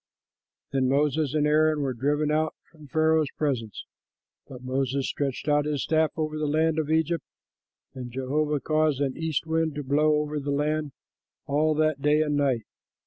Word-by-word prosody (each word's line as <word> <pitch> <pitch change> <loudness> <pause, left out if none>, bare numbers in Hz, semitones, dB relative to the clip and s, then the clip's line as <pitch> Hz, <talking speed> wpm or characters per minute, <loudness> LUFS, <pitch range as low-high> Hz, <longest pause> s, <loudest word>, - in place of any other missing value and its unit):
'" - - -62
Then 130 -1 +2
Moses 145 +1 +1
and 150 -1 +2
Aaron 155 0 +3
were 135 -2 -1
driven 145 +5 0
out 155 +1 0 0.2
from 155 -3 -15
Pharaoh's 155 0 +2
presence, 125 -9 -2 0.6
but 130 -1 -11
Moses 135 +1 -1
stretched 140 0 -3
out 145 0 +3
his 150 -2 -1
staff 160 -1 +2
over 155 -1 -2
the 155 - -1
land 160 +2 +1
of 155 -1 -2
Egypt, 160 0 +1 0.7
and 125 -2 -7
Jehovah 145 +4 -1
caused 155 -3 +1
an 135 -2 -1
east 160 -1 -2
wind 160 -1 0
to 145 - -4
blow 150 +3 +3
over 150 0 -1
the 145 0 -5
land 150 0 -1 0.5
all 155 +2 +1
that 155 -2 +1
day 150 +2 +3
and 150 -1 -1
night. 135 -5 +1
150 Hz, 175 wpm, -26 LUFS, 140-155 Hz, 0.7 s, Aaron